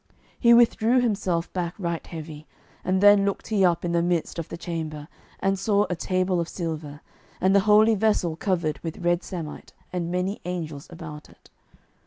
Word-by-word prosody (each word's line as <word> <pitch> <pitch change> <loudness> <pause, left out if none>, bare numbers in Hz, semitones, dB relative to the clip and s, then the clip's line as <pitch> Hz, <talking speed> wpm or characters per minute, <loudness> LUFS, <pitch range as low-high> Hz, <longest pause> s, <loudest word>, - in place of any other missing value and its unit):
He 235 - +5
withdrew 235 +1 +4
himself 195 -8 -1
back 175 -2 -3
right 170 -4 -3
heavy, 155 -2 -8 0.4
and 185 0 +1
then 205 -1 +7
looked 200 +3 -2
he 210 -3 +2
up 175 -1 +2
in 170 - -1
the 170 0 +2
midst 170 -1 -1
of 165 - -5
the - - -6
chamber, 155 -3 -5 0.3
and 195 0 0
saw 205 +1 +2
a - - 0
table 185 +1 0
of 170 - -2
silver, 155 -4 -5 0.4
and 190 +2 +3
the - - +7
holy 215 +2 +6
vessel 205 -6 +1
covered 170 -4 -1
with 165 -1 -6
red 175 0 +2
samite, 170 -6 -7 0.2
and 175 -2 -2
many 180 +3 -2
angels 160 -5 -5
about 160 -3 -9
it. - - -22
175 Hz, 180 wpm, -25 LUFS, 165-195 Hz, 0.4 s, then